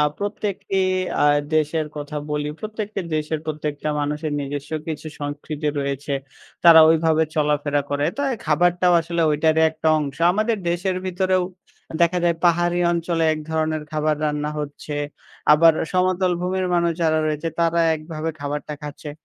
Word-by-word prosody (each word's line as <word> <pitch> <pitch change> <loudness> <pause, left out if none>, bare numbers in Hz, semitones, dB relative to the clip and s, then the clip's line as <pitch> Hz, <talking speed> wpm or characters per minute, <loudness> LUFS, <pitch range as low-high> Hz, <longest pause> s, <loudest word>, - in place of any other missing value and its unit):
আ - - +5 0.2
প্রত্যেকটি 200 -1 -3 0.4
আ - - +5 0.3
দেশের 155 0 0
কথা 150 +1 -5
বলি, 150 0 -1
প্রত্যেকটি 215 -1 -4 0.2
দেশের 155 0 -2
প্রত্যেকটা 150 -1 -3
মানুষের 150 +1 -2
নিজস্ব 145 +1 -5 0.2
কিছু 155 0 -5
সংস্কৃতি 145 +1 -4
রয়েছে, 140 0 -3 0.5
তারা 165 -1 +10
ওইভাবে 160 0 +3
চলাফেরা 145 -1 +1
করে, 145 0 0
তো - - -3
এ - - 0
খাবারটাও 175 +3 +3
আসলে 170 +1 -3
ঐটারই 160 +2 +2
একটা 160 0 -1
অংশ। 140 -3 -4 0.2
আমাদের 215 +3 +1
দেশের 180 +2 -1
ভিতরেও 185 0 +1 0.6
দেখা 170 +1 +3
যায় 170 -1 +2
পাহাড়ি 175 0 +3
অঞ্চলে 170 -1 0
এক 155 - -3
ধরনের 155 -1 -1
খাবার 155 0 +1
রান্না 150 0 -1
হচ্ছে, 150 0 -6 0.6
আবার 165 +2 +7 0.2
সমতল 185 0 +2
ভূমির 185 +1 -1
মানুষ 170 -1 +2
যারা 155 -1 +3
রয়েছে, 155 +2 -2
তারা 170 0 +2
একভাবে 155 0 -4
খাবারটা 145 +1 -4
খাচ্ছে। 150 0 -7
160 Hz, 145 wpm, -22 LUFS, 150-175 Hz, 0.6 s, তারা